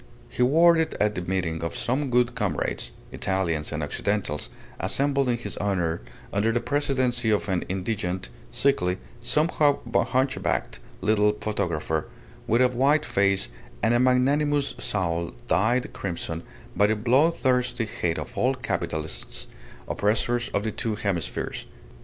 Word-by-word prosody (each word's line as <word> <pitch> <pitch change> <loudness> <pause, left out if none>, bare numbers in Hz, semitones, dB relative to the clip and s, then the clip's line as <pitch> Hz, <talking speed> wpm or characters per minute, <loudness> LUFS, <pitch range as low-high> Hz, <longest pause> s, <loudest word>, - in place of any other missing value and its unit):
He - - -3
wore 165 +7 +6
it 160 -1 0
at 105 0 +2
the 90 - -3
meeting 90 -3 -2
of 85 - -3
some 135 +3 0
good 125 0 +3
comrades, 105 -10 -2 0.2
Italians 85 -6 -1
and 75 0 -2
Occidentals, 85 0 -1 0.3
assembled 140 -1 +2
in 120 - +2
his 120 - -5
honour 90 -5 0 0.3
under 105 +3 +2
the 120 - +1
presidency 130 -2 +1
of 105 -1 +1
an 95 -3 0
indigent, 95 - -2 0.2
sickly, 90 - +1 0.2
somewhat 150 +2 +2 0.2
hunchbacked 130 +1 0 0.2
little 105 +1 +3
photographer, 85 -6 -1 0.4
with 115 +3 +4
a 125 - +5
white 140 +5 +2
face 100 -1 +2 0.4
and 115 +2 +4
a 120 - +4
magnanimous 140 +3 +2
soul 85 -4 -1
dyed 110 +9 +1
crimson 85 -3 -4 0.3
by 105 - +4
a 110 - +2
bloodthirsty 125 0 +2
hate 85 -5 -2
of 120 - -6
all 125 +6 +2
capitalists, 80 - -3 0.4
oppressors 120 +4 +1
of 100 - -1
the 110 - -1
two 110 +1 -2
hemispheres. 100 -7 -3
110 Hz, 135 wpm, -26 LUFS, 95-130 Hz, 0.4 s, wore